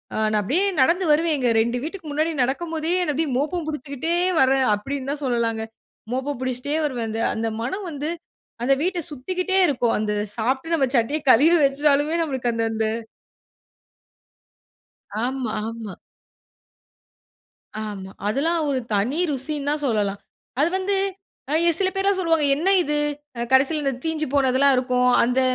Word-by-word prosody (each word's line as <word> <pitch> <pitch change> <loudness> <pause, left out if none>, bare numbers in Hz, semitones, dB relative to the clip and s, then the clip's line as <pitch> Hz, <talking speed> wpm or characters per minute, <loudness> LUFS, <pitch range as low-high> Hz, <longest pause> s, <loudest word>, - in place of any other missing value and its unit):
அ - - -2
நான் 215 - +2
அப்படியே 295 - +1 0.2
நடந்து 350 +6 +3
வருவேன். 315 +1 +3
எங்க 250 -2 +1
2 235 +2 0
வீட்டுக்கு 335 +1 -6
முன்னாடி 310 +3 0
நடக்கும்போதே 320 +4 -2
அத 315 - -2
அப்படியே, 305 +1 -1
"மோப்பம் 315 +4 -1
பிடிச்சுக்கிட்டே 300 +2 -3 0.3
வரேன்." 265 0 +4
அப்படீன்னுதான் 275 +6 -4
சொல்லலாங்க. 230 -3 0 0.5
மோப்பம் 265 +1 -2
பிடிச்சுக்கிட்டே 255 +4 -2
வருவேன். 245 -5 -2
அந்த 225 - -2
அந்த 225 0 -1
மணம் 380 - -3
வந்து, 295 +1 -4 0.5
அந்த 275 +3 +4
வீட்ட 365 0 0
சுத்திக்கிட்டே 365 +8 -2
இருக்கும். 245 -5 +1
அந்த 210 -1 -1 0.2
சாப்ட்டு 265 +8 -1
நம்ப 275 -5 +2
சட்டிய 260 +7 +1
கலுவி 320 +9 +6
வெச்சாலுமே 290 +3 +2
நம்மளுக்கு 260 -5 -1
அந்த 230 0 0
அந்த 220 0 0 2.4
ஆமா. 255 -2 -2
ஆமா. 225 -3 -6 1.9
ஆமா. 200 -3 -6 0.2
அதெல்லாம் 320 +9 +1
ஒரு 270 -2 +1 0.2
தனி 235 +10 0
ருசின்னுதான் 290 +2 -2
சொல்லலாம். 205 -4 0 0.4
அது 310 - +4
வந்து, 395 +1 -1 0.6
அ - - +3
எ - - +6
சில 385 - +2
பேர்லாம் 390 0 +1
சொல்வாங்க. 325 -3 +2
"என்ன 340 +6 0
இது?" 300 -2 -1 0.4
அ - - -3
கடைசியில 275 +1 +3
தீஞ்சு 315 -1 -1
போனதெல்லாம் 270 0 +4
இருக்கும். 250 0 +2
அந்த 250 +2 +2
275 Hz, 140 wpm, -23 LUFS, 245-320 Hz, 2.4 s, கலுவி